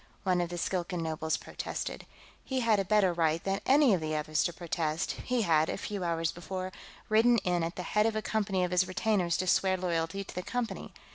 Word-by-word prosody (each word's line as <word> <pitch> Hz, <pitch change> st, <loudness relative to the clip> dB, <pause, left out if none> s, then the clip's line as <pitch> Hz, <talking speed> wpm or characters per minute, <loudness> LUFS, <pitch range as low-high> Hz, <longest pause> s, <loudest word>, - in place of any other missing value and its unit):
one 180 Hz, -3 st, +2 dB
of 175 Hz, -, -2 dB
the 175 Hz, -, -5 dB
Skilkan 175 Hz, 0 st, -2 dB
nobles 160 Hz, 0 st, -1 dB
protested. -, -, -5 dB, 0.4 s
He 260 Hz, -1 st, -2 dB
had 225 Hz, -3 st, +3 dB
a -, -, +2 dB
better 195 Hz, -2 st, +3 dB
right 165 Hz, -1 st, +1 dB
than 195 Hz, 0 st, -1 dB
any 275 Hz, -3 st, +6 dB
of 180 Hz, -, +1 dB
the 155 Hz, 0 st, -2 dB
others 155 Hz, 0 st, 0 dB
to 175 Hz, -, 0 dB
protest; 165 Hz, 0 st, -2 dB
he 250 Hz, -2 st, +1 dB
had, 160 Hz, -3 st, +3 dB
a -, -, -2 dB
few 200 Hz, -3 st, -4 dB
hours 165 Hz, -1 st, 0 dB
before, 185 Hz, +2 st, -5 dB, 0.4 s
ridden 230 Hz, +2 st, +5 dB
in 175 Hz, -1 st, +1 dB
at 165 Hz, +1 st, -3 dB
the 180 Hz, -, -4 dB
head 210 Hz, +5 st, +2 dB
of 225 Hz, -, -1 dB
a 215 Hz, -, 0 dB
company 200 Hz, -4 st, 0 dB
of 180 Hz, -, -1 dB
his 180 Hz, 0 st, +3 dB
retainers 185 Hz, -3 st, +1 dB
to 185 Hz, -, -1 dB
swear 190 Hz, +1 st, +3 dB
loyalty 175 Hz, +1 st, -1 dB
to -, -, -11 dB
the 180 Hz, -, -3 dB
Company. 245 Hz, +4 st, -4 dB
180 Hz, 220 wpm, -30 LUFS, 170-210 Hz, 0.4 s, any